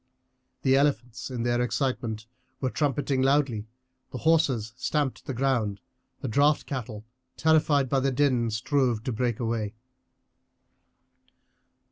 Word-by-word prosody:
The 135 0 +4
elephants 125 -4 0
in 125 -3 -3
their 120 0 +1
excitement 120 -4 -2 0.3
were 130 -2 -1
trumpeting 140 -2 0
loudly; 135 -6 +2 0.4
the - - -6
horses 130 -9 +2
stamped 140 +1 -2
the 135 - -2
ground; 115 -6 0 0.4
the - - -3
draught 145 +5 +3
cattle, 110 -5 -5 0.3
terrified 155 -3 +3
by 135 +2 +2
the 135 +1 +1
din, 125 -3 +2
strove 120 0 0
to 130 - -2
break 120 0 -1
away. 115 -3 -2
130 Hz, 120 wpm, -27 LUFS, 115-140 Hz, 0.4 s, The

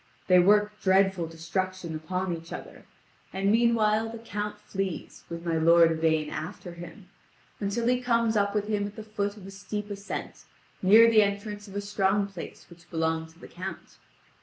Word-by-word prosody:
They 180 -1 +6
work 210 +3 +3
dreadful 190 -2 +3
destruction 170 +2 -4
upon 180 +3 -2
each 165 0 -11
other; - - -9 0.5
and 195 +1 +1
meanwhile 225 -1 +3
the 230 - -7
Count 210 -2 -5
flees 195 -4 -5
with 170 0 -6
my 165 -1 +1
lord 165 +1 +6
Yvain 160 -1 +1
after 175 +2 -6
him, 175 +2 -11 0.5
until 210 +3 -1
he 250 +1 +2
comes 230 -2 +2
up 200 0 +1
with 210 0 0
him 205 -1 0
at 205 - -11
the 220 - -7
foot 205 -1 -3
of 195 - -11
a 195 - -9
steep 205 +1 -6
ascent, 200 0 -6 0.4
near 215 +5 +8
the 225 -2 +6
entrance 205 +1 -2
of 195 - -11
a 205 - -1
strong 200 0 +1
place 195 -4 -9
which 170 -1 -17
belonged 160 -1 -1
to 165 +1 -21
the - - -11
Count. 185 +2 -8
195 Hz, 180 wpm, -27 LUFS, 170-210 Hz, 0.5 s, near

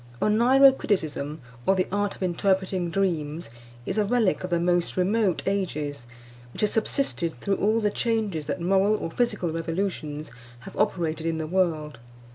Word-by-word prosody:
ONEIRO 255 +6 +6
CRITICISM, 155 - -2 0.3
or 195 - +5
the 185 - +1
art 205 0 -1
of - - -6
interpreting 185 0 0
dreams, 165 -7 -2 0.3
is 195 - -1
a - - +4
relic 215 -3 +1
of 185 - -3
the 170 -1 +1
most 175 0 +1
remote 190 -1 +1
ages, 150 -10 -2 0.5
which - - -5
has 210 - +2
subsisted 210 - -1
through 195 +7 0
all 215 +3 +2
the 210 -2 +1
changes 215 -11 -1
that 185 - -2
moral 195 +4 +3
or 165 - -4
physical 210 -6 0
revolutions 165 -2 -3 0.3
have - - -11
operated 165 -2 0
in 165 -1 -1
the 160 - -3
world. 155 -6 -1
185 Hz, 160 wpm, -26 LUFS, 160-205 Hz, 0.5 s, ONEIRO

